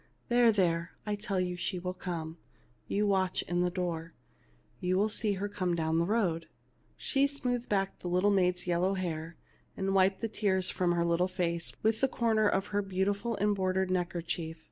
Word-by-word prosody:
There, 240 -1 +5
there, 170 -4 +1
I 210 - -1
tell 205 -2 -2
you 180 -1 -1
she 180 +1 -2
shall 180 +1 -3
come. 170 -3 -5 0.5
You 210 +1 +1
watch 190 -2 +1
in 175 0 -1
the 180 - +2
door, 170 -2 -3 0.7
and 180 - -2
you 185 - +3
will 210 +3 +2
see 215 -1 +2
her 200 +1 -2
come 185 -4 -1
down 160 0 +1
the 170 - +1
road." 185 -7 0 0.5
She 275 0 +2
smoothed 250 -4 -2
back 195 -1 0
the - - -6
little 180 +3 +3
maid's 180 -2 +2
yellow 180 +2 +1
hair, 165 -3 -4 0.4
and 195 0 0
wiped 190 0 +3
the 225 - 0
tears 190 -4 0
from 175 -1 +1
her 170 0 +1
little 170 +2 +2
face 170 -2 -2
with 220 0 +2
a 270 - +4
corner 225 -4 +2
of 195 -1 +1
her 205 - +2
beautiful 200 +3 -1
embroidered 190 -2 +1
neck 180 0 0
erchief. 165 -1 -3
185 Hz, 190 wpm, -31 LUFS, 175-205 Hz, 0.7 s, There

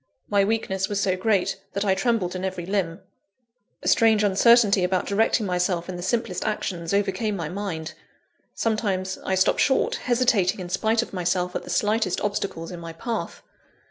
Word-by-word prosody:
My 200 -1 +3
weakness 195 -3 -1
was 205 -1 -1
so 190 -2 +1
great, 195 -1 0
that 200 +1 -1
I 195 - +3
trembled 195 -3 0
in 185 - -4
every 185 -2 -3
limb. 190 -2 -2 0.8
A - - -4
strange 220 -2 +4
uncertainty 205 0 +5
about 185 0 0
directing 220 +2 +1
myself 180 -2 0
in 185 - -5
the 175 - -6
simplest 190 -1 -1
actions, 170 -5 -3
overcame 200 +1 0
my 165 -5 -4
mind. 175 -5 -4 0.6
Sometimes, 195 -4 -1
I 190 - 0
stopped 190 - +2
short, 265 - +2
hesitating 235 -7 +1
in 180 -1 -6
spite 220 +5 +1
of - - -12
myself 180 0 -1
at - - -1
the - - -10
slightest 210 -3 +1
obstacles 200 -5 -3
in 175 - -7
my 165 -1 -8
path. 225 +7 -5
195 Hz, 175 wpm, -24 LUFS, 180-215 Hz, 0.8 s, uncertainty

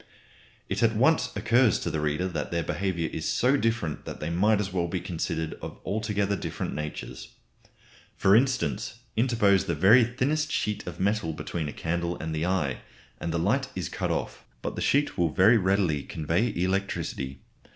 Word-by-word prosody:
It - - -2
at 115 -1 +3
once 140 +9 +3
occurs 110 +2 +3
to - - -2
the 80 - -1
reader 75 +4 0
that 90 - -3
their 85 -1 -1
behaviour 85 -1 -1
is 80 - -2
so 130 +3 +3
different 115 - -1
that - - -7
they 75 +2 -3
might 105 +5 +3
as 100 -3 -3
well 85 -2 0
be 90 +2 -2
considered 80 -2 -3
of - - -7
altogether 100 0 0
different - - -4
natures. 75 0 -6 0.8
For 100 +1 +5
instance, 125 - +1 0.2
interpose 110 -5 +3
the 85 - -1
very 105 +10 +6
thinnest 135 +6 0
sheet 105 -2 -2
of 85 -1 -6
metal 100 -4 0
between 80 0 -4
a - - -4
candle 85 +2 -2
and 80 0 -4
the 80 +2 -1
eye, 80 -8 0 0.4
and 85 - -3
the 85 - 0
light 125 +11 +1
is 90 -2 -3
cut - - -3
off. - - -3 0.2
But - - -3
the - - -4
sheet 145 -7 +1
will 85 -2 +3
very 110 +9 +5
readily 95 -6 +1
convey 85 - -1
electricity. 90 -7 -2
95 Hz, 180 wpm, -27 LUFS, 85-110 Hz, 0.8 s, very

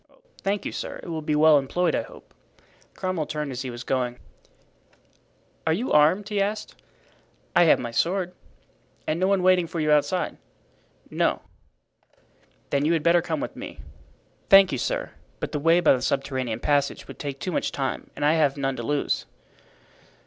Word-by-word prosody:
"Thank 200 +1 -1
you, - - -2
sir; - - -6
it - - -8
will 160 -1 -3
be 150 0 -1
well 155 -1 +6
employed, 175 +7 0
I - - +1
hope." - - -14 0.6
Cromwell 185 -5 -2
turned 150 -2 -3
as 125 0 -4
he 130 - -4
was 120 0 -7
going. 125 -2 -1 1.5
"Are 160 - +4
you 225 +10 -2
armed?" 160 +7 +4
he 205 -2 0
asked. 210 +2 -2 0.8
"I 175 - +6
have 160 - +6
my 120 - -5
sword." 180 +8 0 0.7
"And 155 +2 -1
no 185 - +2
one 195 -2 +2
waiting 185 -2 +4
for 165 0 -5
you 155 -1 +1
outside?" 150 +5 +1 0.7
"No." - - 0 1.3
"Then 140 0 +1
you 160 +3 +2
had 160 -2 0
better 170 +1 +4
come 160 -3 -3
with - - -5
me." - - -8 0.7
"Thank 195 -1 +8
you, - - -2
sir, - - -2 0.3
but - - -4
the 150 - -2
way 165 +3 +4
by 165 - +5
the 130 - -1
subterranean 130 -4 -2
passage 145 -1 0
would - - -11
take 140 -2 -5
too 185 - -3
much - - -1
time 135 -1 -3
and - - -1
I 150 - +5
have 150 -3 +2
none 135 -1 -1
to - - -4
lose." 145 +4 -1
155 Hz, 180 wpm, -25 LUFS, 140-180 Hz, 1.5 s, Thank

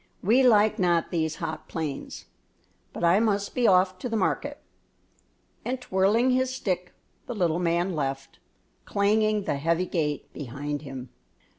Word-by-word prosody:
We 230 +7 +4
like 215 -4 +4
not 175 -2 +2
these 160 -2 -1
hot 155 -1 -5
plains; 155 -4 -5 0.7
but - - -6
I 170 +4 +5
must 205 -3 0
be 245 -2 +2
off 185 0 +3
to 245 - -4
the 225 - 0
market," 285 +8 -1 1.0
and, 255 +1 -2
twirling 220 +3 +2
his 255 0 +1
stick, 180 -8 -3 0.3
the 245 - -4
little 175 -4 +1
man 175 +1 +1
left, 135 -2 -4 0.4
clanging 210 +1 +1
the 145 - -1
heavy 165 +5 +1
gate 150 -5 -2
behind 145 +1 -5
him. 135 -3 -8
185 Hz, 145 wpm, -26 LUFS, 160-215 Hz, 1.0 s, I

